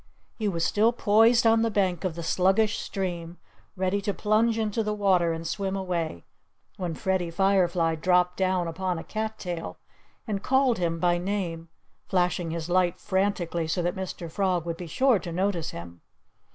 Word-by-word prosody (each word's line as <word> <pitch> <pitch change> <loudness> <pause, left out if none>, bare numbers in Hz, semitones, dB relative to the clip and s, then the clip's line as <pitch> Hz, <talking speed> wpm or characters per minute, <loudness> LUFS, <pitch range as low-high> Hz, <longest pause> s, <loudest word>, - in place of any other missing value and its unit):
He 215 - 0
was 170 -4 0
still 220 +3 +3
poised 230 +1 +4
on 225 0 +5
the 230 - +2
bank 190 -5 0
of 180 -4 -2
the 170 - -5
sluggish 195 +6 +2
stream, 175 -3 -4 0.4
ready 190 +1 0
to 200 0 -2
plunge 220 +2 +2
into 220 0 0
the 210 -1 -1
water 185 -5 +2
and 165 0 -4
swim 195 +3 -2
away, 170 - -3 0.5
when 175 -4 -3
Freddie 185 -1 -1
Firefly 175 -2 +2
dropped 180 +2 +2
down 185 -2 0
upon 180 +2 -2
a 165 - -6
cat 220 0 -4
tail 175 -4 -5 0.5
and 205 -4 -3
called 265 -3 +2
him 165 -2 0
by 175 0 +2
name, 175 -4 -3 0.4
flashing 180 -2 0
his 165 0 -4
light 180 -1 +1
frantically 190 -4 -1
so 170 +2 -1
that 175 +1 0
Mr. 185 -2 -5
Frog 185 -3 0
would 170 -1 -3
be 175 - -7
sure 255 - +3
to 175 - -7
notice 180 -1 -1
him. 85 0 -9
185 Hz, 175 wpm, -26 LUFS, 170-205 Hz, 0.5 s, on